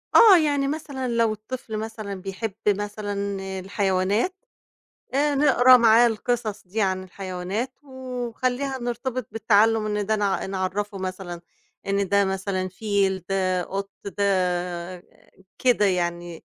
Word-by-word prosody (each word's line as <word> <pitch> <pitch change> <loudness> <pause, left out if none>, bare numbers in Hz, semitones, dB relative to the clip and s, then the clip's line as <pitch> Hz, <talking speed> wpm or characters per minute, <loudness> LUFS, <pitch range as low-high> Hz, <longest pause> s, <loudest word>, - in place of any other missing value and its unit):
آه، 425 -6 +9
يعني 285 -3 +1
مثلًا 285 -3 -4
لو 230 -2 +2
الطفل 220 +1 -6
مثلًا 215 -2 -5
بيحب 195 +2 -4
مثلًا 205 -1 -1 0.2
الحيوانات، 195 - 0 0.8
آآ، 290 +1 +2
نقرا 255 -3 +6
معاه 235 0 +6
القصص 225 -3 -2
دي 215 +4 -2
عن 185 -1 0
الحيوانات، 185 +5 -4
ونخلّيها 255 0 -3
نرتبط 245 0 -3
بالتعلم، 220 0 +3
إن 210 -1 -1
ده 220 +2 +1
نع 200 -2 0
نعرّفه 195 +2 -3
مثلًا 185 -2 -5 0.5
إن 200 0 +1
ده 200 0 +4
مثلًا 190 -1 -2
فيل، 195 -1 0
ده 185 -2 +1
قُط، 195 +2 -5 0.3
ده 180 -2 -1 0.6
كده 245 -5 +3
يعني. 175 -2 -2
205 Hz, 120 wpm, -24 LUFS, 190-240 Hz, 0.8 s, آه